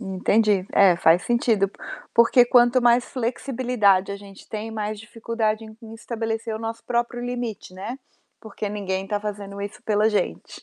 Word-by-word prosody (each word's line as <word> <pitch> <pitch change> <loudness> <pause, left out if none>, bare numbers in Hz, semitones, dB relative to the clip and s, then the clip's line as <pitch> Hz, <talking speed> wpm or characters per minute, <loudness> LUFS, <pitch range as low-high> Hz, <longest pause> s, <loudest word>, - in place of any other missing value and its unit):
Entendi. 200 0 +1
É, 190 -3 +5
faz 170 +2 +4
sentido, 230 -4 +2 0.5
porque 235 +2 +6
quanto 245 +1 +4
mais 240 0 +4
flexibilidade 235 -6 0
a - - -5
gente 200 -1 -14
tem, 220 +1 -5
mais 215 -1 -4
dificuldade 225 -1 -2
em 220 +1 -12
estabelecer 225 0 -4
o - - -4
nosso 225 +1 -6
próprio 240 0 -2
limite, 240 -6 -5
né. 210 +8 -6 0.4
Porque 215 -1 -6
ninguém 195 -2 -3
está 205 +1 -2
fazendo 200 -1 -6
isso 205 +4 -7
pela 215 0 +2
gente. 210 -2 -3
220 Hz, 155 wpm, -23 LUFS, 200-235 Hz, 0.5 s, porque